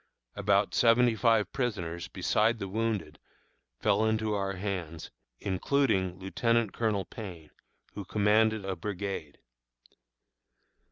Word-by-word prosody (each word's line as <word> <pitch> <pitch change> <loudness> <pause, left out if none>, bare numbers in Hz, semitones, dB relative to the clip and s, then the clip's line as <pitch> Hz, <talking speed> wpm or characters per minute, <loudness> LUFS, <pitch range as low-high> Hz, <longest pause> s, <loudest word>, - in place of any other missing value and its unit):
About 100 0 +2
seventy 120 0 +4
five 110 -4 +2
prisoners, 90 - -3
beside 115 +2 +1
the 100 - -5
wounded, 100 -6 -2 0.6
fell 100 - +2
into 110 -1 +1
our 95 -1 -1
hands, 90 -4 -5 0.3
including 95 -2 0
Lieutenant 115 +3 0
Colonel 105 -5 0
Payne, 90 -10 -9 0.4
who 100 - -6
commanded 105 +1 +2
a 95 -1 -2
brigade. 95 -4 -5
105 Hz, 105 wpm, -29 LUFS, 95-110 Hz, 0.6 s, seventy